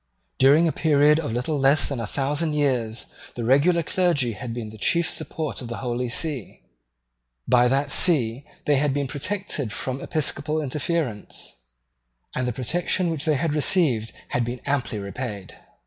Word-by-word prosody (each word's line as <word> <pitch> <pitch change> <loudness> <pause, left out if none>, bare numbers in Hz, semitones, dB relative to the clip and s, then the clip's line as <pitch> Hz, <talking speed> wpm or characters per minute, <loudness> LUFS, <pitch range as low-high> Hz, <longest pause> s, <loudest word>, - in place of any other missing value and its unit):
During 145 +6 +6
a - - +2
period 150 -1 +4
of 150 -8 -3
little 125 +6 -1
less 140 +2 +4
than 140 -4 -3
a 115 - -3
thousand 145 +6 -1
years 125 -6 0 0.3
the 120 - -4
regular 145 +8 +3
clergy 160 -8 +1
had 115 +2 -6
been 115 -2 -5
the 110 - -12
chief 170 - +2
support 155 -4 -2
of 125 - -6
the 120 - -5
Holy 125 -1 -2
See. 140 -2 -4 0.8
By 125 0 +5
that 135 +2 +1
See 130 -8 +3 0.2
they 145 -1 +3
had 140 0 +1
been 140 -1 -1
protected 145 - -2
from 130 +5 -3
episcopal 155 0 -1
interference; 145 - -3 0.8
and 125 0 -1
the - - 0
protection 165 +8 0
which 160 -1 -3
they 155 -2 +3
had 155 +2 0
received 145 - +2 0.2
had 125 - 0
been 120 +2 -4
amply 140 -6 -1
repaid. 100 0 -6
140 Hz, 165 wpm, -24 LUFS, 120-155 Hz, 0.8 s, During